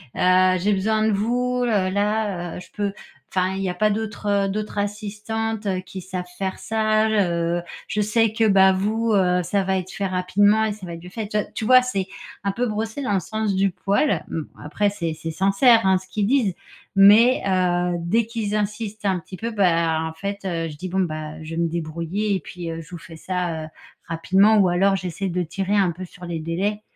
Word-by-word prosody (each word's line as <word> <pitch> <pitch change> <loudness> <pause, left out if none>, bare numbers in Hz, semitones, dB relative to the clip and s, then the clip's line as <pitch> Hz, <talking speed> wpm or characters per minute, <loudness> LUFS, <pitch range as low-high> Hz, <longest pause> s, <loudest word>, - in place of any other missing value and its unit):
«Heu, 185 0 +4
j'ai 205 +4 +2
besoin 215 +3 +1
de - - +2
vous, 245 +4 0
heu, 205 -5 +1
là, 200 -3 -1
heu, - - -6
je - - -13
peux 205 -1 -2 0.4
enfin 185 0 +1
il 195 - -3
y 190 - 0
a - - -2
pas 215 +4 +2
d'autres 205 -2 -1
d'autres 210 +1 -4
assistantes 215 +2 -3 0.2
qui 190 +1 -8
savent 185 0 -5
faire 190 -1 -3
ça. 215 0 +1
Heu, 175 -5 +1 0.3
je 210 - -1
sais 220 +1 +2
que, 225 0 +2
bah, 190 -1 +6
vous, 220 +4 0
heu, 180 -2 +3
ça 200 +3 0
va 190 0 0
être 185 0 -5
fait 200 - -3
rapidement 200 +4 +3
et 215 - -1
ça 200 -2 -10
va 170 - -7
être 165 - -12
mieux 180 - -9
fait». 215 +2 -5
Tu 210 - -1
vois 210 - 0
tu 220 - -3
vois? 255 +2 +7
C'est 195 -7 -2 0.4
un 200 - 0
peu 245 +5 -1
brosser 220 +4 -3
dans 210 - 0
le 195 - +3
sens 215 +3 -2
du 195 0 +2
poil. 200 - 0
Mmh, 165 - -2 0.2
après 205 +7 0
c'est 170 -5 -3
c'est 165 +1 -6
sincère, 195 - +4
hein, 190 0 +4
ce 185 0 -10
qu'ils 205 -2 -1
disent. 230 -8 +2 0.4
Mais, 215 +6 +7
heu, 180 -2 +1
dès 205 +7 +1
qu'ils 225 -2 -3
insistent 210 0 -3
un 190 -2 +1
petit 185 +2 -11
peu, 230 +1 -4
bah, 170 -6 +2
en 160 0 -4
fait, 200 +5 -5
heu, 165 -3 -2
je 150 - -9
dis: 185 +4 -5
«Bon, 190 +2 -1
bah, 155 -2 -4
je 160 +1 -6
vais 170 - 0
me 170 - +1
débrouiller 170 +5 -2
et - - -1
puis, 175 +2 -7
heu, 165 0 -5
je 160 - -14
vous 175 - -6
fais 165 0 -12
ça, 175 -2 -3
heu, - - -9 0.4
rapidement» 190 +6 +4
ou 195 -3 +5
alors 195 +3 +3
j'essaie 185 +1 -4
de 180 +1 -1
tirer 195 +4 -2
un 190 -3 +3
peu 180 +3 -8
sur 180 0 -12
les 170 -2 -4
délais 190 +6 -2
195 Hz, 225 wpm, -23 LUFS, 180-215 Hz, 0.4 s, vois